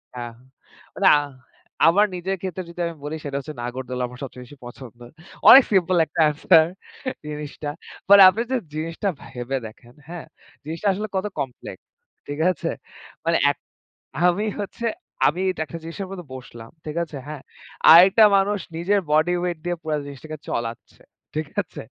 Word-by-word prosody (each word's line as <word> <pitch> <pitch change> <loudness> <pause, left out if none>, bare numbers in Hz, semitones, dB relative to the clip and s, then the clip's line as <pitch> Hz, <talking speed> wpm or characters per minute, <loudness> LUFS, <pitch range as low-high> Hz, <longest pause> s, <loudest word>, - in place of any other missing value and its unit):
হ্যাঁ, 120 -1 -6 0.6
মানে - - +2
আ - - +5 0.7
আমার 205 +5 +5
নিজের 190 +2 -2
ক্ষেত্রে 185 -1 -4
যদি 170 - -12
আমি 165 - -7
বলি 150 +2 -4
সেটা 140 -1 -3
হচ্ছে 150 +2 -8
নাগরদোলা 125 +1 -4
আমার 125 0 -13
সবচেয়ে 125 -1 -8
বেশি 145 +3 -15
পছন্দ। 120 -1 -11 0.5
অনেক 265 +1 +11
সিম্পল 185 -2 +3
একটা 155 - -2
আনসার 160 +2 +4 0.6
জিনিসটা। 150 0 -6 0.4
মানে 200 0 +9
আপনি 215 +5 -2
যে 260 - +2 0.2
জিনিসটা 165 +5 -3 0.2
ভেবে 125 +2 -4
দেখেন, 120 +3 -16
হ্যাঁ 175 -1 -8 0.4
জিনিসটা 165 +7 -4
আসলে 210 +3 -4
কত 190 +2 -1
কমপ্লেক্স, 130 -3 -6 0.5
ঠিক 145 +1 -5
আছে? 170 - -4 0.6
মানে - - +3
এক - - -10 0.7
আমি 185 +4 +2 0.2
হচ্ছে 230 +3 -5 0.4
আমি 175 +5 +1
এটা 175 - -6
একটা 165 - -7
জিনিস 165 - -8 0.4
বসলাম 115 -3 -11
ঠিক 155 +1 -6
আছে? 155 -3 -11
হ্যাঁ 150 -3 -7 0.5
আরেকটা 190 +6 +8
মানুষ 200 +1 +1 0.2
নিজের 195 +4 +1
বডি 155 +4 +3
ওয়েট 175 -2 -2
দিয়ে 175 0 -2
পুরা 155 -1 -1
জিনিসটাকে 155 +2 -9
চলাচ্ছে 115 0 -5 0.3
ঠিক 155 -1 -2 0.2
আছে? 180 - -11
160 Hz, 155 wpm, -23 LUFS, 135-185 Hz, 0.7 s, অনেক